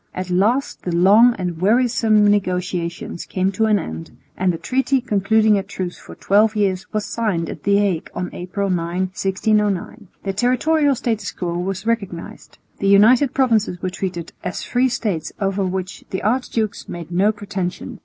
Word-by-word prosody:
At 185 Hz, 0 st, -4 dB
last 220 Hz, +10 st, +1 dB
the 180 Hz, -, -3 dB
long 210 Hz, +7 st, +6 dB
and 175 Hz, -3 st, -4 dB
wearisome 225 Hz, 0 st, +3 dB
negotiations 180 Hz, -4 st, -1 dB
came 190 Hz, +1 st, -1 dB
to 220 Hz, +3 st, +1 dB
an 215 Hz, -1 st, +3 dB
end, 80 Hz, -, -6 dB, 0.3 s
and 185 Hz, 0 st, +1 dB
the 165 Hz, -, -4 dB
treaty 265 Hz, +6 st, 0 dB
concluding 220 Hz, -2 st, +2 dB
a -, -, -1 dB
truce 190 Hz, -2 st, -6 dB
for -, -, -12 dB
twelve 215 Hz, +2 st, +3 dB
years 200 Hz, -1 st, -1 dB
was 215 Hz, -1 st, -2 dB
signed 210 Hz, -6 st, -2 dB
at 155 Hz, -, -9 dB
the 200 Hz, +4 st, +3 dB
Hague 195 Hz, -5 st, 0 dB
on 180 Hz, -, -3 dB
April 190 Hz, +2 st, -3 dB
9,1609. 190 Hz, +4 st, -1 dB, 0.2 s
The 195 Hz, -, -2 dB
territorial 275 Hz, +7 st, +2 dB
status 225 Hz, -6 st, -2 dB
quo 175 Hz, -2 st, -4 dB
was 190 Hz, +3 st, -3 dB
recognised. 200 Hz, -7 st, -4 dB, 0.2 s
The 200 Hz, -, 0 dB
United 235 Hz, +7 st, +5 dB
Provinces 225 Hz, -9 st, +2 dB
were 185 Hz, -, -1 dB
treated 180 Hz, -3 st, -5 dB
"as 180 Hz, -, -4 dB
free 255 Hz, +1 st, +1 dB
States 205 Hz, -9 st, -3 dB
over 195 Hz, -1 st, 0 dB
which 185 Hz, 0 st, -4 dB
the 190 Hz, -, -4 dB
archdukes 225 Hz, -1 st, -1 dB
made 170 Hz, -1 st, -7 dB
no 195 Hz, +5 st, +3 dB
pretensions." 195 Hz, -4 st, -5 dB
200 Hz, 165 wpm, -20 LUFS, 180-220 Hz, 0.3 s, long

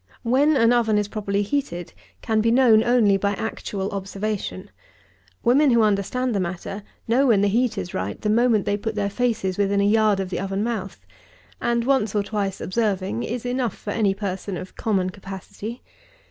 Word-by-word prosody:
When 275 Hz, +5 st, +3 dB
an 230 Hz, 0 st, +4 dB
oven 225 Hz, -3 st, +2 dB
is 205 Hz, -1 st, 0 dB
properly 205 Hz, -1 st, -1 dB
heated, 195 Hz, -, -3 dB, 0.3 s
can 220 Hz, -1 st, +1 dB
be 230 Hz, -, +2 dB
known 230 Hz, -3 st, +5 dB
only 230 Hz, -5 st, +4 dB
by 200 Hz, +1 st, 0 dB
actual 200 Hz, -2 st, -4 dB
observation. 195 Hz, 0 st, -4 dB, 0.7 s
Women 270 Hz, +5 st, +4 dB
who 235 Hz, -2 st, +4 dB
understand 215 Hz, +5 st, 0 dB
the 200 Hz, -, 0 dB
matter, 185 Hz, +3 st, -4 dB, 0.3 s
know 255 Hz, +5 st, +3 dB
when 215 Hz, -5 st, +4 dB
the 205 Hz, -, +3 dB
heat 225 Hz, +1 st, +1 dB
is 175 Hz, -, -4 dB
right 95 Hz, +2 st, -3 dB
the -, -, -3 dB
moment 225 Hz, -1 st, +3 dB
they 205 Hz, -, 0 dB
put 220 Hz, +1 st, -4 dB
their 200 Hz, -1 st, -1 dB
faces 215 Hz, -5 st, -1 dB
within 200 Hz, 0 st, +2 dB
a -, -, +3 dB
yard 210 Hz, -1 st, +3 dB
of 190 Hz, -1 st, -3 dB
the -, -, -2 dB
oven 195 Hz, +2 st, -2 dB
mouth; 215 Hz, -5 st, -4 dB, 0.6 s
and 235 Hz, 0 st, +1 dB
once 250 Hz, -6 st, +1 dB
or 205 Hz, -, +2 dB
twice 200 Hz, -2 st, -3 dB
observing 190 Hz, -, -1 dB
is 240 Hz, -, -4 dB
enough 245 Hz, -1 st, -1 dB
for 205 Hz, -, -6 dB
any 205 Hz, -3 st, +1 dB
person 195 Hz, -1 st, -4 dB
of 185 Hz, -, -9 dB
common 190 Hz, -4 st, 0 dB
capacity. 195 Hz, +4 st, -8 dB
210 Hz, 185 wpm, -23 LUFS, 195-235 Hz, 0.7 s, known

